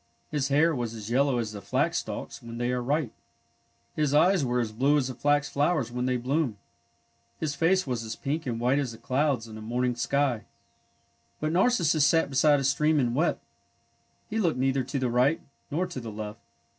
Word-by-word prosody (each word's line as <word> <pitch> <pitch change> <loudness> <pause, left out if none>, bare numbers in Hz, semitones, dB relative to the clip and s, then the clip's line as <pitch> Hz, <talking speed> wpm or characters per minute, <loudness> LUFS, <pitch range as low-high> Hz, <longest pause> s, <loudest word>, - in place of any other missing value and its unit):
His 145 -3 0
hair 150 +4 +3
was 120 -4 -3
as 110 0 -7
yellow 135 +1 +2
as 115 -3 -2
the 105 -2 -8
flax - - 0
stalks - - -6
when 115 0 -8
they 120 +1 0
are 125 0 -1
ripe. 140 0 0 0.8
His 150 -2 +1
eyes 180 +2 +4
were 125 -1 0
as 115 -3 -1
blue 135 +7 +2
as 130 -3 0
the - - -4
flax 145 +3 +1
flowers 145 -4 0
when 125 +1 -2
they 125 -1 +1
bloom. 130 -2 -1 0.8
His 155 -3 -1
face 180 +6 +2
was 125 -4 -2
as 110 0 -5
pink 150 +3 -3
and 120 - -1
as - - -5
white 130 +4 +2
as 130 -5 -2
the - - -11
clouds 130 -3 0
in 110 -1 -9
a - - -9
morning 125 +3 -1
sky. 130 -1 0 0.9
But 155 +1 -1
Narcissus 170 - +3
sat 150 0 +3
beside 145 +2 +4
a - - -2
stream 150 +3 +2
and 120 -3 +1
wept. 160 +7 0 0.8
He 225 0 -2
looked 170 -9 +1
neither 135 +1 +1
to 135 +3 -4
the 130 -1 0
right 130 +6 +3 0.3
nor 170 +6 0
to 180 -7 -6
the 115 -3 -7
left. 105 0 -6
135 Hz, 205 wpm, -27 LUFS, 120-150 Hz, 0.9 s, eyes